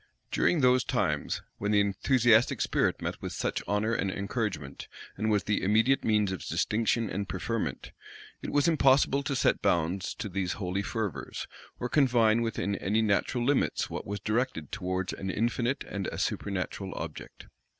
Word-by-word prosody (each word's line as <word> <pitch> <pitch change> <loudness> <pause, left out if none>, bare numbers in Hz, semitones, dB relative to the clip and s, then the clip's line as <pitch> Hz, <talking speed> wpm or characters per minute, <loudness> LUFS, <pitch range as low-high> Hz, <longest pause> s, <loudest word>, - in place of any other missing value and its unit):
During 170 - +2
those 125 -1 +4
times, - - -1 0.2
when 100 - -1
the 105 -1 +4
enthusiastic 115 +4 +3
spirit - - +1
met - - -4
with - - -5
such - - -2
honor 105 +3 +1
and 100 -3 0
encouragement, 100 - -3 0.3
and 110 +3 -1
was 105 -3 +2
the 105 +2 0
immediate 110 +7 +3
means 105 -3 +2
of 95 - -5
distinction 115 +1 0
and 100 -1 -4
preferment, - - -3 0.5
it - - -5
was 145 +1 +3
impossible 140 -3 +4
to 140 0 -2
set - - +2
bounds 85 +3 0
to - - -4
these 95 -2 -2
holy 95 0 -2
fervors, 105 -3 -4 0.3
or 125 - -1
confine 120 -5 +3
within 110 -3 -1
any 105 +5 +1
natural 110 +4 +1
limits 140 +1 +1
what - - -5
was 100 +1 -3
directed 110 - -1
towards 95 -2 -2
an 95 - -5
infinite 120 +5 0
and 100 -1 -4
a - - -5
supernatural 95 0 -3
object. - - -7
105 Hz, 160 wpm, -29 LUFS, 95-120 Hz, 0.5 s, those